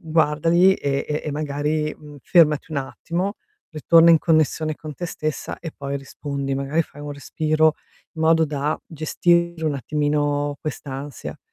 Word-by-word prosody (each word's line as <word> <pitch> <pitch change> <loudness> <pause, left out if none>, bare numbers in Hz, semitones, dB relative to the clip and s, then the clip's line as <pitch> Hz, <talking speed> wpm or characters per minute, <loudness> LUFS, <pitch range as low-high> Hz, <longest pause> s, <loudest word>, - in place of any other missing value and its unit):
guardali 165 +2 +3
e 140 -4 -1
e 150 0 -2
e 150 - -2
magari, 150 +1 -1
mhmm, 150 -1 -13
fermati 155 -5 +3
un 145 - 0
attimo, 175 +8 -3 0.4
ritorna 165 +1 +5
in 165 - +7
connessione 155 -1 +1
con 155 -1 -8
te 175 - -5
stessa 155 -2 -4
e 165 - -6
poi 140 0 -3
rispondi. 140 0 -4
Magari 140 +4 0
fai 145 -2 -13
un 145 0 -5
respiro, 155 +2 +1 0.4
in 160 - -5
modo 160 0 +4
da 145 +1 -2
gestire 170 +2 +1
un 155 -2 +1
attimino 145 +1 0
quest'ansia, 140 -1 -6
150 Hz, 150 wpm, -22 LUFS, 145-160 Hz, 0.4 s, in